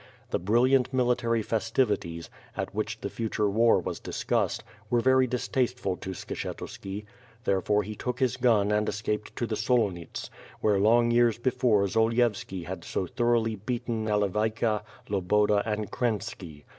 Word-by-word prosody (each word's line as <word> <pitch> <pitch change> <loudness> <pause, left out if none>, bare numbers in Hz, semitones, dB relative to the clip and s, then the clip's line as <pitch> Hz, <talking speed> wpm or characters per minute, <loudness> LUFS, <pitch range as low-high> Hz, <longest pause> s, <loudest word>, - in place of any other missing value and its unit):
The - - +1
brilliant 125 +7 +3
military 120 -3 +1
festivities, 105 -7 -1 0.3
at - - -3
which - - -3
the - - -2
future 110 -2 -1
war 115 +3 +4
was - - -4
discussed, - - -1 0.3
were 120 - +3
very 130 +1 +4
distasteful 125 -3 -1
to 95 0 -6
Skshetuski. 100 +4 -6 0.4
Therefore 105 +1 +1
he 105 +2 -6
took 125 +3 -4
his 130 -1 +2
gun 115 -5 +3
and 105 0 +1
escaped 105 0 -3
to 120 - -1
the 110 - -2
Solonits, 105 -7 -1 0.3
where 105 -2 +2
long 120 +3 +4
years 120 -1 +4
before 120 -4 +2
Zolievski 110 -3 +1
had 85 0 -6
so 95 - -2
thoroughly 120 -1 +1
beaten 115 +1 -3
Nale 105 -1 +2
vayka, 110 +2 0 0.3
Loboda, 105 +1 +2
and 105 -1 -2
Krenpski. 105 -10 -3
110 Hz, 145 wpm, -28 LUFS, 105-120 Hz, 0.4 s, war